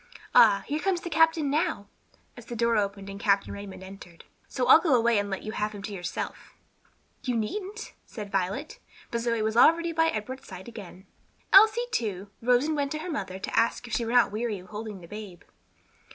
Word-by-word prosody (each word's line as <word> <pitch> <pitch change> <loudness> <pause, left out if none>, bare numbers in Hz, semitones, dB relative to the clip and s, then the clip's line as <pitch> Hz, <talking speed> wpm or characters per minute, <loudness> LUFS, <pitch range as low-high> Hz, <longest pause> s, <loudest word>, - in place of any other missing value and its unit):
Ah, 220 -5 +6
here 300 +2 -2
comes 370 0 0
the 345 - -6
captain 325 -2 +3
now," 295 - 0 0.5
as 240 -2 -13
the 240 - -6
door 235 0 +2
opened 200 -1 -1
and 200 0 -7
Captain 200 -1 +1
Raymond 200 -2 -9
entered; 190 -3 -12 0.2
"so 255 - -2
I'll 265 - +9
go 325 -6 +2
away 235 -2 +3
and 205 0 -3
let 195 - -4
you 215 - -5
have 215 0 -2
him 200 -1 -9
to 205 - -5
yourself." 175 -3 -6 0.7
"You 250 -2 -1
needn't," 400 - -4
said 210 -4 -9
Violet, 195 +11 -2 0.3
but 235 - -1
Zoe 230 -2 0
was 220 0 -1
already 335 +7 +5
by 325 0 +2
Edward's 255 0 -4
side 190 +1 -10
again. 200 -5 -10 0.5
Elsie, 435 +4 +7
too, 200 - -3
rose 245 +3 +3
and 310 0 -1
went 285 -1 -1
to - - -2
her 340 +3 -5
mother 190 -11 -4
to 190 - -5
ask 230 +2 +1
if 235 - -8
she 235 - +1
were 230 - -3
not 245 -3 +4
weary 215 0 -2
of 185 0 -13
holding 210 -2 -7
the 170 - -12
babe. 205 -3 -9
230 Hz, 210 wpm, -27 LUFS, 200-285 Hz, 0.7 s, I'll